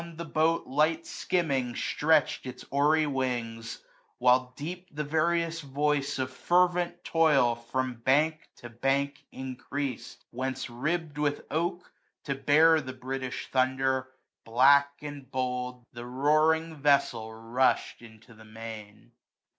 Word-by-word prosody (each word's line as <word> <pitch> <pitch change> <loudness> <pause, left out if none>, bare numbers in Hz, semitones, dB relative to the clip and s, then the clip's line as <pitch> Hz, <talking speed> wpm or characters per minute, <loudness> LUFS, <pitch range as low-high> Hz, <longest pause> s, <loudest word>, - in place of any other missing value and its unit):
The 170 +1 -6
boat, 160 +1 +1
light 155 +4 +1
skimming, 135 -9 -1
stretch'd 150 -3 +1
its 125 - -8
oary 150 +3 +3
wings; 120 -5 -3 0.3
While 125 0 +3
deep 175 +5 -6
the 150 0 -3
various 165 +2 0
voice 145 0 -1
of 130 0 -2
fervent 175 +1 +1
toil 150 -7 +3
13a 115 0 -18
From 130 +1 -1
bank 150 +6 +1
to 120 - -11
bank 140 +4 -1
increased; 130 +1 -5
whence 130 0 -4
ribb'd 150 +4 -2
with 145 -1 -1
oak. 175 +3 -2 0.3
To 140 - -2
bear 155 +4 +4
the 130 -2 -7
British 130 0 -5
Thunder, 130 0 +1 0.4
black, 140 +5 +5
and 145 -3 -8
bold,* 125 -1 -3
The 120 0 -8
roaring 155 +5 +2
vessel 140 -6 +2
rush'd 120 +4 0
into 115 0 -15
the 110 0 -15
main. 110 -1 -10
135 Hz, 125 wpm, -28 LUFS, 125-155 Hz, 0.4 s, black